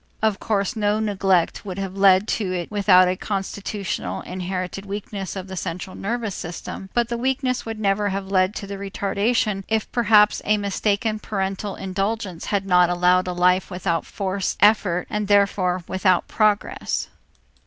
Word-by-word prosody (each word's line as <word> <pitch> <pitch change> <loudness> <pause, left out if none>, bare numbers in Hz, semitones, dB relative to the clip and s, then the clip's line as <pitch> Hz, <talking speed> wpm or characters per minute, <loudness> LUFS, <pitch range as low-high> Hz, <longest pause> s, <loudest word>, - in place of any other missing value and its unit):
Of 215 -2 +2
course 200 -3 -1
no 210 0 +1
neglect 195 -5 +1
would 190 -2 -6
have 195 -1 -4
led 195 +1 +5
to 200 -4 -1
it 175 0 -3
without 195 -3 +5
a 180 - +1
constitutional, 200 0 -4
inherited 185 +1 -4
weakness 200 -1 -5
of 190 -2 -5
the 190 - -7
central 185 +1 -5
nervous 225 0 -3
system, 175 +3 -7
but 240 -1 +2
the 235 0 -2
weakness 255 -1 -1
would 225 -1 -5
never 205 0 +1
have 195 0 -3
led 185 +1 +2
to 200 - -5
the 200 0 -7
retardation 200 +1 0
if 220 -1 -1
perhaps 215 -3 +4
a 210 0 +2
mistaken 205 +2 -1
parental 195 -1 -3
indulgence 195 -1 -3
had 200 -2 -1
not 180 -2 +4
allowed 180 +1 +3
a 180 - -2
life 180 +1 +2
without 180 -3 -2
forced 195 -1 -2
effort 200 -4 +3
and, 210 -1 -2
therefore, 195 -3 +2
without 185 -1 +2
progress. 215 -2 0
195 Hz, 160 wpm, -23 LUFS, 185-210 Hz, -, led